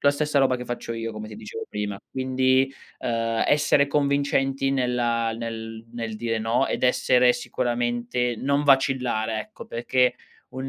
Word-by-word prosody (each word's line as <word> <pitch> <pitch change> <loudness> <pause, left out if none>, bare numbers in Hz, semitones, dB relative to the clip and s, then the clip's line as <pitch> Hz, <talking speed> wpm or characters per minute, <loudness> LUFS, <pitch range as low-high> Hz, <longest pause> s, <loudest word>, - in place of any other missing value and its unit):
la 140 - +5
stessa 150 0 0
roba 130 -2 +3
che 125 - -7
faccio 120 -1 -5
io, 115 0 -4
come 110 0 -7
ti 105 - -9
dicevo 105 -1 -7
prima. 105 -1 -4
Quindi, 130 +1 +2 0.3
uhm, 115 -1 0
essere 145 -1 +4
convincenti 140 -1 +1
nella 120 -3 0
nel 115 -1 -6
nel 115 -2 -4
dire 115 0 -1
no, 115 +2 +1
ed - - -3
essere 125 0 +4
sicuramente 120 0 -1
non 140 +4 +1
vacillare, 125 -5 +2
ecco, 215 - -10
perché 125 +2 +1 0.4
un 130 +1 -5
125 Hz, 150 wpm, -25 LUFS, 115-135 Hz, 0.4 s, la